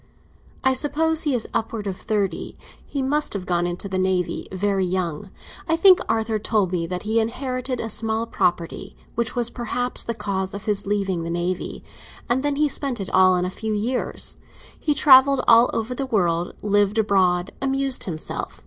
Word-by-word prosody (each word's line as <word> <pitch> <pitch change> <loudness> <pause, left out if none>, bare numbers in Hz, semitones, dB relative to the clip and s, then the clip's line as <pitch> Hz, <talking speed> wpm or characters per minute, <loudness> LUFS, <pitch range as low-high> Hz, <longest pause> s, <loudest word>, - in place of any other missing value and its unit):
"I 265 - +4
suppose 315 +4 +1
he 290 -5 +1
is 230 - -1
upwards 220 -2 -2
of 190 - -3
thirty. 200 -4 -2 0.3
He 275 -2 -4
must 295 +3 0
have 195 -3 -4
gone 175 -1 0
into 175 +3 -1
the 190 -1 -2
Navy 185 -1 -1
very 195 0 0
young. 180 -1 -2 0.4
I 325 - +4
think 370 +2 +7
Arthur 220 -1 0
told 210 -3 0
me 170 -2 -1
that 180 +1 -4
he 220 +2 +1
inherited 255 +2 -2
a 225 - -3
small 225 +1 -1
property—which 180 +5 -2
was 240 -1 +1
perhaps 245 +1 -1
the 230 - -3
cause 195 -3 -3
of 200 - -8
his 205 -2 0
leaving 195 -4 -1
the 165 - -4
Navy—and 180 +7 -4
that 290 0 -1
he 300 0 +3
spent 275 -4 0
it 195 - -5
all 185 0 +5
in 180 0 0
a 180 - -3
few 220 +2 -4
years. 235 +5 -2 0.4
He 295 - 0
travelled 275 -1 +6
all 230 +1 +7
over 225 +2 -2
the 270 +2 -4
world, 175 -7 0
lived 205 0 +2
abroad, 190 -4 +2
amused 270 -1 +1
himself. 160 -4 -5
215 Hz, 175 wpm, -23 LUFS, 185-255 Hz, 0.4 s, think